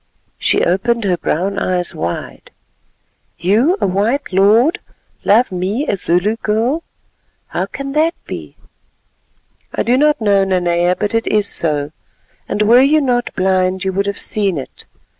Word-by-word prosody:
She -, -, +2 dB
opened 230 Hz, +6 st, 0 dB
her 185 Hz, -3 st, +1 dB
brown 185 Hz, +4 st, -2 dB
eyes 180 Hz, -1 st, -1 dB
wide. 85 Hz, +2 st, -5 dB, 0.9 s
"You, 235 Hz, -, +2 dB
a -, -, +1 dB
white 205 Hz, +6 st, -1 dB
lord, 215 Hz, -, +4 dB, 0.4 s
love 230 Hz, +3 st, +3 dB
me, 190 Hz, +10 st, -2 dB
a -, -, +1 dB
Zulu 190 Hz, +4 st, +1 dB
girl? 230 Hz, +9 st, 0 dB, 0.7 s
How -, -, -2 dB
can 275 Hz, 0 st, -6 dB
that 315 Hz, +4 st, +1 dB
be?" -, -, -8 dB, 1.2 s
"I -, -, 0 dB
do 245 Hz, +2 st, +2 dB
not 300 Hz, -1 st, +3 dB
know, 200 Hz, -3 st, +3 dB
Nanea, 175 Hz, -1 st, +1 dB
but 210 Hz, +2 st, -3 dB
it 230 Hz, 0 st, 0 dB
is 210 Hz, -1 st, +1 dB
so, 150 Hz, -5 st, 0 dB, 0.6 s
and 210 Hz, -, 0 dB
were 235 Hz, +4 st, +6 dB
you 295 Hz, +3 st, +4 dB
not 245 Hz, -4 st, 0 dB
blind 185 Hz, 0 st, +1 dB
you 190 Hz, 0 st, -1 dB
would 200 Hz, +1 st, -1 dB
have 200 Hz, -, -2 dB
seen 200 Hz, -5 st, -1 dB
it. 135 Hz, -, -7 dB
200 Hz, 150 wpm, -17 LUFS, 185-240 Hz, 1.2 s, were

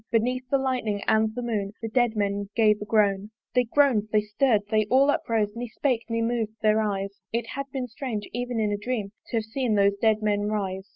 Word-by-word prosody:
Beneath 250 Hz, +3 st, 0 dB
the 275 Hz, -, +3 dB
lightning 250 Hz, -6 st, -1 dB
and 220 Hz, 0 st, +3 dB
the 245 Hz, -, -3 dB
moon 210 Hz, -4 st, -2 dB
The 225 Hz, -, -4 dB
dead 240 Hz, 0 st, +1 dB
men 200 Hz, -1 st, -1 dB
gave 215 Hz, -2 st, +3 dB
a -, -, -4 dB
groan. 205 Hz, -2 st, +2 dB, 0.2 s
They 250 Hz, 0 st, +3 dB
groan'd, 235 Hz, -4 st, +3 dB
they 215 Hz, -, +4 dB
stirr'd, 210 Hz, +1 st, +1 dB
they 215 Hz, -1 st, +3 dB
all 275 Hz, +3 st, +5 dB
uprose, 220 Hz, -5 st, -1 dB
Ne 240 Hz, +1 st, -4 dB
spake, 245 Hz, 0 st, -1 dB
ne 230 Hz, 0 st, 0 dB
mov'd 225 Hz, -2 st, -1 dB
their 215 Hz, 0 st, +4 dB
eyes: 200 Hz, -1 st, -3 dB
It 235 Hz, 0 st, -1 dB
had 275 Hz, 0 st, -4 dB
been 260 Hz, -2 st, -3 dB
strange, 230 Hz, -4 st, -5 dB
even 245 Hz, 0 st, -2 dB
in 210 Hz, -1 st, +1 dB
a 205 Hz, -, 0 dB
dream 210 Hz, -2 st, -3 dB, 0.2 s
To 235 Hz, -, -2 dB
have 225 Hz, -, 0 dB
seen 225 Hz, 0 st, -1 dB
those 200 Hz, 0 st, +3 dB
dead 220 Hz, -1 st, +3 dB
men 205 Hz, -1 st, +1 dB
rise. 195 Hz, -2 st, -3 dB
220 Hz, 220 wpm, -26 LUFS, 210-245 Hz, 0.2 s, all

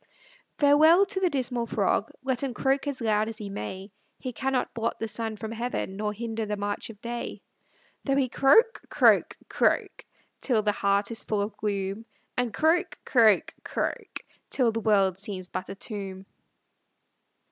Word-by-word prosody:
Farewell 315 Hz, +6 st, +6 dB
to 385 Hz, -1 st, -3 dB
the 370 Hz, -2 st, +2 dB
dismal 250 Hz, -5 st, -1 dB
frog; 205 Hz, 0 st, +1 dB
Let 260 Hz, -2 st, -1 dB
him 265 Hz, -3 st, -3 dB
croak 270 Hz, +1 st, +1 dB
as 275 Hz, -3 st, -3 dB
loud 215 Hz, -1 st, +1 dB
as 225 Hz, -, -7 dB
he 205 Hz, -3 st, -6 dB
may, 190 Hz, -, -6 dB, 0.3 s
He 255 Hz, -2 st, -6 dB
cannot 265 Hz, +1 st, -1 dB
blot 230 Hz, 0 st, -2 dB
the 225 Hz, -, -3 dB
sun 220 Hz, 0 st, -3 dB
from 220 Hz, +1 st, -6 dB
heaven, 230 Hz, -4 st, -3 dB
Nor 210 Hz, +1 st, -2 dB
hinder 225 Hz, 0 st, -4 dB
the 210 Hz, 0 st, -2 dB
march 205 Hz, +2 st, -3 dB
of 215 Hz, -3 st, -11 dB
day, 235 Hz, 0 st, -5 dB, 0.6 s
Though 275 Hz, -, +2 dB
he 275 Hz, -2 st, +2 dB
croak, 365 Hz, -, +4 dB
croak, -, -, +4 dB
croak, -, -, +1 dB, 0.4 s
Till 230 Hz, -5 st, +1 dB
the 210 Hz, -, +3 dB
heart 200 Hz, +1 st, +1 dB
is 230 Hz, -, -5 dB
full 215 Hz, -, -2 dB
of 205 Hz, 0 st, -5 dB
gloom, 200 Hz, +1 st, -3 dB, 0.3 s
And 245 Hz, -2 st, 0 dB
croak, 335 Hz, -, +1 dB
croak, 220 Hz, -6 st, +4 dB
croak, -, -, -3 dB, 0.3 s
Till 245 Hz, -4 st, +2 dB
the 225 Hz, -, -2 dB
world 195 Hz, -4 st, +2 dB
seems 195 Hz, -2 st, -5 dB
but 185 Hz, -, -5 dB
a 195 Hz, -, -5 dB
tomb. 195 Hz, -2 st, -6 dB
225 Hz, 170 wpm, -27 LUFS, 205-260 Hz, 0.6 s, Farewell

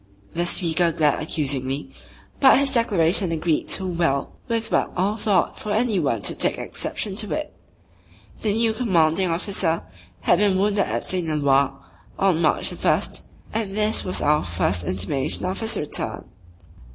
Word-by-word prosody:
The 175 Hz, +1 st, 0 dB
speaker 170 Hz, -1 st, +1 dB
glared 155 Hz, -3 st, +1 dB
accusingly; 140 Hz, -3 st, -2 dB, 0.5 s
but 265 Hz, -2 st, +7 dB
his 275 Hz, 0 st, +2 dB
declaration 190 Hz, -6 st, +2 dB
agreed 160 Hz, -1 st, 0 dB
too 190 Hz, -, -2 dB
well 165 Hz, -6 st, 0 dB, 0.2 s
with 230 Hz, -2 st, -2 dB
what -, -, +1 dB
all 195 Hz, +4 st, +1 dB
thought 205 Hz, -5 st, +1 dB
for 210 Hz, -, -4 dB
any 220 Hz, -2 st, +2 dB
one 115 Hz, -10 st, 0 dB
to -, -, -1 dB
take -, -, +1 dB
exception 200 Hz, -3 st, -3 dB
to 210 Hz, -1 st, -1 dB
it. 305 Hz, 0 st, -5 dB, 0.9 s
The 215 Hz, -, +1 dB
new 225 Hz, +1 st, +2 dB
Commanding 185 Hz, -6 st, +2 dB
Officer 170 Hz, -1 st, -1 dB, 0.4 s
had 175 Hz, -, +3 dB
been 200 Hz, -2 st, +3 dB
wounded 200 Hz, 0 st, +2 dB
at -, -, -2 dB
St. 180 Hz, -3 st, -1 dB
Eloi 140 Hz, -2 st, +3 dB, 0.5 s
on 185 Hz, -4 st, +2 dB
March 155 Hz, -, +1 dB
1st -, -, 0 dB, 0.3 s
and 215 Hz, -2 st, -2 dB
this 215 Hz, 0 st, +1 dB
was 185 Hz, -, -2 dB
our 150 Hz, +1 st, +3 dB
first 90 Hz, 0 st, 0 dB
intimation 130 Hz, -, -2 dB
of 185 Hz, +1 st, -2 dB
his 225 Hz, 0 st, 0 dB
return. 150 Hz, -, -3 dB
175 Hz, 155 wpm, -23 LUFS, 155-210 Hz, 0.9 s, but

